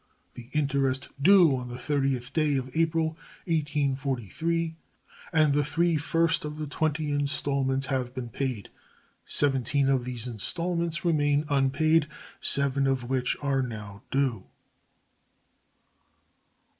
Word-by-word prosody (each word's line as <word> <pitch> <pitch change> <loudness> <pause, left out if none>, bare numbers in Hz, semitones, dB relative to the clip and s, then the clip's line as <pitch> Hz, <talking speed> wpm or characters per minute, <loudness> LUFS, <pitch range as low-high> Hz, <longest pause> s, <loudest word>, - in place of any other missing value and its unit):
The 120 0 -11
interest 140 -3 0
due 175 -3 +6
on 125 -1 -5
the 120 - -6
30th 135 -2 -1
day 155 -3 +2
of 130 -1 -4
April, 165 0 +2 0.4
1843, 150 - -1 0.6
and 155 -4 +4
the 145 +1 +2
three 165 +4 +1
first 165 +2 +1
of 150 0 -5
the 155 - -3
twenty 150 +1 -1
installments 140 -2 0
have 130 -2 -2
been 125 -2 -5
paid. 125 -4 -3 0.6
Seventeen 135 0 +1
of 130 -2 +2
these 125 -2 -5
installments, 170 - -2
remain 145 -3 +2
unpaid, 150 +3 +2 0.3
seven 140 0 +2
of 130 -2 -1
which 130 -1 0
are 135 -2 +1
now 105 -5 -6
due. 135 -3 0
140 Hz, 120 wpm, -27 LUFS, 130-155 Hz, 0.6 s, due